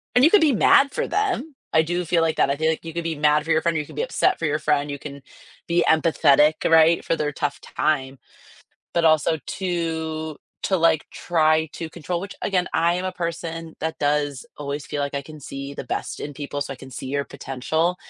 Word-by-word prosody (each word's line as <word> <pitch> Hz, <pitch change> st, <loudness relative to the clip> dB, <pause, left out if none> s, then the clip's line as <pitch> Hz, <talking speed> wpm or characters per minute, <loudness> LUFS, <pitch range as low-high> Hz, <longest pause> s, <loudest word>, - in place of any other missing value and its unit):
and 250 Hz, -, +5 dB
you 320 Hz, -, +5 dB
could 415 Hz, -, +6 dB
be 300 Hz, -4 st, +4 dB
mad 275 Hz, +5 st, +5 dB
for -, -, -2 dB
them. 370 Hz, -7 st, -1 dB, 0.2 s
I 160 Hz, -, +5 dB
do 175 Hz, +2 st, -1 dB
feel 165 Hz, 0 st, +2 dB
like 160 Hz, -1 st, 0 dB
that. -, -, +3 dB
I 140 Hz, -, +1 dB
feel 160 Hz, +2 st, +1 dB
like 160 Hz, +1 st, -2 dB
you 165 Hz, -, -6 dB
could 170 Hz, -1 st, -3 dB
be 165 Hz, -1 st, -2 dB
mad 150 Hz, +1 st, +3 dB
for 165 Hz, -, -1 dB
your 160 Hz, -, +3 dB
friend, 170 Hz, 0 st, 0 dB
or 155 Hz, -, +1 dB
you -, -, -8 dB
could -, -, -13 dB
be -, -, -1 dB
upset 380 Hz, -6 st, +1 dB
for -, -, -1 dB
your 150 Hz, +1 st, 0 dB
friend, 145 Hz, -1 st, +1 dB
you 140 Hz, -, -4 dB
can 140 Hz, -1 st, -9 dB, 0.5 s
be 170 Hz, +1 st, +2 dB
empathetic, 155 Hz, -1 st, +4 dB
right, 165 Hz, +1 st, +5 dB
for 165 Hz, -, +1 dB
their 150 Hz, -1 st, -1 dB
tough 145 Hz, 0 st, -3 dB
time. 135 Hz, -3 st, -1 dB, 0.8 s
But 170 Hz, -1 st, +2 dB
also 155 Hz, 0 st, +3 dB, 0.2 s
to 160 Hz, -4 st, -2 dB, 0.3 s
to 190 Hz, -, +2 dB
like, 165 Hz, -3 st, +3 dB
try 160 Hz, -2 st, +2 dB
to 165 Hz, -, -6 dB
control, 170 Hz, +2 st, -4 dB
which, 200 Hz, +2 st, -7 dB
again, 185 Hz, -2 st, 0 dB
I 170 Hz, +2 st, +3 dB
am 180 Hz, -, -3 dB
a 185 Hz, -, -1 dB
person 165 Hz, -1 st, -5 dB
that 160 Hz, +1 st, -3 dB
does 145 Hz, -2 st, 0 dB
always 145 Hz, -1 st, -4 dB
feel 145 Hz, -, -3 dB
like 140 Hz, 0 st, -3 dB
I 140 Hz, -, -2 dB
can 155 Hz, +2 st, -12 dB
see 140 Hz, 0 st, -7 dB
the -, -, -6 dB
best -, -, -4 dB
in 145 Hz, -, -6 dB
people, 145 Hz, 0 st, -5 dB
so 140 Hz, -1 st, -3 dB
I -, -, -10 dB
can 130 Hz, +1 st, -12 dB
see 130 Hz, -, -7 dB
your 140 Hz, +1 st, -1 dB
potential, 160 Hz, +7 st, -1 dB
160 Hz, 235 wpm, -23 LUFS, 145-170 Hz, 0.8 s, could